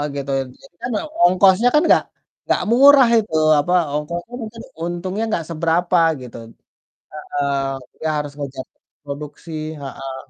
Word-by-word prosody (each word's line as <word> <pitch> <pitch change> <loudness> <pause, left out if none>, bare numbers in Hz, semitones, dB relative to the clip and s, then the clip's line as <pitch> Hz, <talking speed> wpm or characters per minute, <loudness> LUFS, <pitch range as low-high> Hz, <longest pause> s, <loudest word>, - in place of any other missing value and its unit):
gitu, 140 0 -5 0.3
jadi - - -19
kan 245 - -3
ya - - -2 0.2
ongkosnya 190 +6 +5
kan 300 - +6
nggak - - +5 0.4
nggak - - +1
murah 270 0 +7
itu, 210 -7 -4 0.2
apa, 175 +5 0 0.2
ongkosnya 170 +9 -4
mungkin 225 +1 -9 0.2
untungnya 185 +5 -3
nggak 165 -6 -2
seberapa 170 +2 +1 0.2
gitu 125 -2 -10 0.3
t - - -88 0.6
heeh, 140 -1 0 0.5
ya 160 - +1
harus 145 -1 -4
ngejar 135 -2 -6 0.4
produksi 145 +3 -8 0.3
heeh. 135 -1 -7
170 Hz, 140 wpm, -20 LUFS, 145-205 Hz, 0.6 s, murah